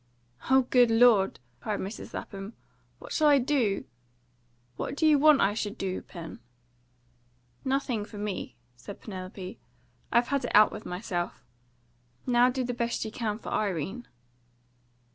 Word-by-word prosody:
"O 265 0 +6
good 245 -1 +4
Lord!" 225 - +5 0.2
cried 210 +7 -3
Mrs. 200 +4 -6
Lapham. 195 +2 -7 0.4
"What - - -12
shall 310 - +3
I 290 -1 +7
do? 250 -7 +1 0.9
What - - -4
do 315 - +1
you 300 -2 +6
want 300 -1 +6
I 200 - +3
should 210 -1 -3
do, 190 -1 -3
Pen?" 170 -3 -9 1.2
"Nothing 260 -5 0
for 210 - -10
me," 205 -2 -4 0.2
said 130 +12 -10
Penelope. 185 -2 -8 0.5
"I've 235 +1 +3
had 280 -1 0
it 245 - -3
out 210 +1 +7
with 215 - -8
myself. 180 -1 -4 0.8
Now 245 0 +4
do 255 0 -1
the 245 0 -2
best 235 -1 -2
you 220 - -5
can 215 -2 -2
for - - -8
Irene." 200 - -2
220 Hz, 145 wpm, -28 LUFS, 195-250 Hz, 1.2 s, I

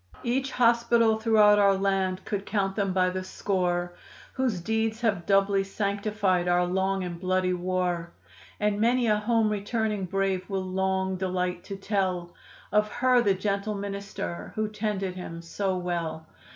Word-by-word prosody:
'" - - -19
Each 270 +1 0
hospital 235 -2 +3
throughout 215 -2 +5
our 200 -1 +5
land 190 -1 0
could 200 -2 -2
count 195 -2 -1
them 195 -2 0
by 185 0 +2
the 185 0 -3
score 180 -2 -1 0.4
Whose 255 -8 0
deeds 220 +4 -1
have 200 -7 0
doubly 195 0 +3
sanctified 200 -2 -1
our 175 0 +3
long 190 +1 0
and 175 -1 -5
bloody 185 0 +1
war, 180 -1 -1 0.5
And 210 0 0
many 240 +2 +3
a 210 -2 +3
home 225 +1 +2
returning 210 -1 -1
brave 190 0 -1
will 190 -1 -2
long 190 0 -1
delight 180 -1 -2
to 195 - -5
tell 190 -3 -2 0.4
Of 210 0 +2
her, 255 0 +4
the 200 -4 +2
gentle 200 +2 -2
minister, 200 - -5
who 215 0 -1
tended 210 -3 -2
him 170 -2 -7
so 190 +2 -2
well. 170 -3 -3
195 Hz, 155 wpm, -27 LUFS, 185-210 Hz, 0.5 s, throughout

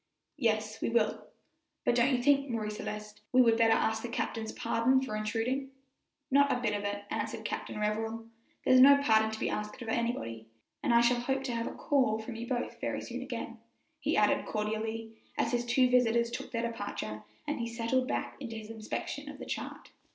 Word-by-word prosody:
"Yes, 215 -1 0
we - - 0
will; 230 -2 +1 0.6
but - - +4
don't 245 +2 +4
you 245 - -1
think, 280 0 +4
Marie 220 -3 -2
Celeste, 210 0 -6
we 255 - +4
would 230 -3 +6
better 225 -1 +5
ask 220 0 +1
the 240 - -5
captain's 225 -1 -2
pardon 235 +3 +2
for 260 -5 -3
intruding?" 225 +6 -1 0.6
"Not 280 +1 +5
a 245 - +1
bit 225 -4 0
of 205 0 -2
it," 205 0 -3
answered - - -3
Captain - - -4
Revell; 220 +2 -1 0.4
"there's 255 - +6
no 280 +2 +9
pardon 220 -3 +4
to 220 0 -5
be - - 0
asked 210 +4 -4
of 235 -3 -6
anybody, 170 - -2 0.3
and - - +1
I 235 0 +6
shall 240 +1 +3
hope 265 +2 -1
to 255 -3 -2
have 230 0 -1
a - - -6
call 260 -7 +2
from 220 +2 -6
you 235 +1 -5
both 245 -1 -3
very - - -2
soon - - -6
again," - - -5 0.4
he - - 0
added - - +3
cordially 220 +1 -2 0.3
as 230 - +1
his 240 -1 0
two 250 +1 +4
visitors 235 -2 +3
took - - -5
their 230 -2 -1
departure, 205 - -4 0.2
and 295 -1 -2
he 235 - -1
settled 235 +2 0
back - - -3
to 270 - -5
his 220 0 -8
inspection 225 +6 -5
of 290 - -8
the - - -8
chart. - - -6
230 Hz, 205 wpm, -31 LUFS, 220-250 Hz, 0.6 s, no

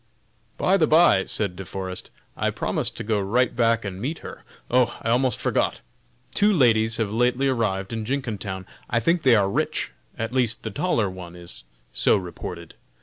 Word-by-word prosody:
"By 190 +2 +3
the 160 -4 +3
by!" 155 - +5
said 100 -4 +2
De 95 - -7
Forest, 95 0 -6 0.3
"I - - 0
promised - - -2
to - - -4
go 105 -1 0
right 115 +6 +1
back 115 -1 +2
and 95 -1 -5
meet 150 +6 -2
her. - - -9 0.3
Oh! 125 -1 +3
I 115 - 0
almost 125 +1 +2
forgot! - - 0 0.5
two 210 +1 +4
ladies 115 - +3
have 110 -3 -1
lately 125 +3 +2
arrived 105 -6 -1
in 110 -1 -3
Jenkintown; 105 -7 -3 0.2
I 115 - +2
think 165 +9 +2
they 130 -5 +5
are 100 -3 +3
rich, 100 - -1 0.3
at 115 +2 -3
least 125 -3 0
the 110 - -4
taller 115 - 0
one 90 -2 -8
is 85 -8 -11 0.3
so 65 - +3
reported. 85 -2 -7
115 Hz, 180 wpm, -24 LUFS, 95-125 Hz, 0.5 s, by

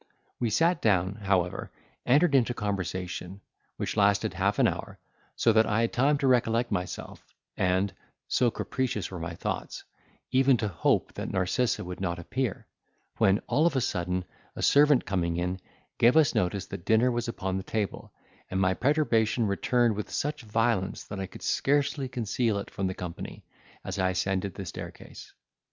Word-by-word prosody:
We 120 - +1
sat 165 - +2
down, 95 -3 +2
however, 95 -3 -1 0.4
entered 145 +5 +4
into 120 -2 +3
conversation, 95 -2 -4 0.4
which - - -3
lasted 100 -1 +2
half - - 0
an - - +5
hour, - - -4 0.4
so 115 - +3
that 110 0 +4
I 105 +2 +1
had 115 - 0
time 140 +4 +3
to 140 -1 0
recollect 120 -1 +2
myself; 90 0 -4 0.3
and 95 +1 +1 0.3
(so 125 -1 +3
capricious 115 -3 -2
were 90 - -6
my 85 +1 -5
thoughts) - - -4 0.5
even 130 0 +4
to 110 - -1
hope 85 -4 +1
that - - -5
Narcissa 95 +6 0
would 90 +1 -7
not 85 -2 -1
appear—when, 100 -1 -2
all 155 +4 +3
of 160 - -1
a - - +3
sudden, 90 -3 -1 0.3
a - - -4
servant 145 -2 +5
coming 85 -4 -1
in, 90 +1 -2 0.4
gave 120 +6 +5
us 155 -1 +5
notice 90 +1 0
that 100 -3 -8
dinner 115 +3 +4
was 120 0 -2
upon 95 -5 -2
the 95 - -4
table, 105 0 -3 0.4
and 95 - -1
my 95 -1 +3
perturbation 120 -3 +2
returned 115 +3 +2
with 105 - -4
such 150 0 -2
violence 110 -3 0
that 100 - -7
I 95 - -3
could - - -12
scarcely 140 -1 +1
conceal 115 -2 0
it 100 - -6
from 95 - -2
the 95 - -3
company, 90 -2 -7 0.4
as 95 +1 -4
I 95 0 +2
ascended 95 0 -1
the 100 - -6
staircase. - - -9
105 Hz, 170 wpm, -28 LUFS, 95-125 Hz, 0.5 s, an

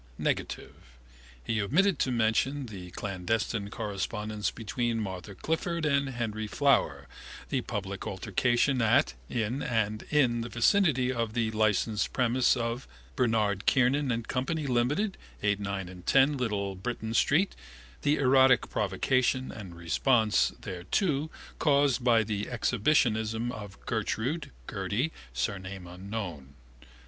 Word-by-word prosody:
Negative: - - -2 0.7
he 110 - 0
omitted 165 - +2
to 130 - +1
mention 120 +5 +1
the 95 -6 -8
clandestine 100 +3 -2
correspondence 105 0 -3
between 115 +2 -2
Martha 95 -1 -5
Clifford 160 - -2
and 140 -2 +2
Henry 110 -4 -3
Flower, 140 +3 +2 0.4
the - - 0
public - - -5
altercation 125 +1 +1
at, 115 +7 +3 0.2
in 120 +3 -1
and 110 -2 0
in 125 -6 +3
the 120 - -5
vicinity 130 - +3
of 115 -3 -2
the 115 -2 0
licensed 110 0 +1
premises 125 0 +3
of 115 +2 -3 0.3
Bernard 110 -5 +1
Kiernan 135 +1 +3
and 115 -1 -2
Co, - - -1
Limited, 145 - 0 0.3
8, 105 -1 +2
9 100 -2 -3
and 90 -1 -11
10 135 +8 +4
Little 105 -6 -1
Britain 110 +3 -4
street, 155 +11 +3 0.5
the 145 +1 +3
erotic 130 -1 +4
provocation 130 +6 +1
and 95 -6 -9
response 105 - +2
thereto 140 - -1 0.3
caused 140 -4 +3
by 115 -2 +4
the 105 -1 -3
exhibitionism 115 -1 +1
of 105 -4 -9
Gertrude 125 +7 -2 0.2
(Gerty), 105 +9 -1 0.2
surname 95 +8 -4
unknown. 90 -6 -6
115 Hz, 120 wpm, -29 LUFS, 105-130 Hz, 0.7 s, 10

